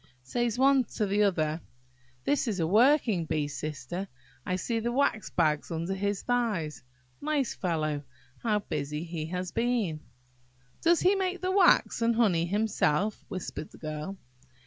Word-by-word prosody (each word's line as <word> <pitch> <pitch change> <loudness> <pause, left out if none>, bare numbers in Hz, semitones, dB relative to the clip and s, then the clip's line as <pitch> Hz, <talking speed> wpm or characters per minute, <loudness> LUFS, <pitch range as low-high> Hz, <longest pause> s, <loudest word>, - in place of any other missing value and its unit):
Says 235 - -1
the 250 - -2
one 270 -1 +5
to 215 - +1
the 200 +1 +1
other, 160 -5 +1 0.6
"This 280 - +1
is 205 -5 -1
a 165 - +2
working 220 - +4
bee, 150 -2 -1
Sister; 150 +5 -5 0.4
I 185 - -1
see 225 +5 -1
the 235 +2 -1
wax 240 -5 +1
bags 155 -3 +1
under 170 +3 -2
his 200 0 -2
thighs. 215 - -1 0.4
Nice 290 -4 0
fellow! 155 -5 -1 0.4
how 215 -3 +1
busy 150 -3 -3
he 165 -2 -4
has 180 +1 -3
been!" 230 -10 0 0.8
"Does 340 0 +4
he 370 - +5
make 375 -2 -1
the 370 0 0
wax 375 -10 +4
and 230 0 +3
honey 185 -8 +3
himself?" 205 -1 +1
whispered 185 -4 -5
the - - -14
Girl. 155 +5 -5
195 Hz, 155 wpm, -29 LUFS, 160-240 Hz, 0.8 s, one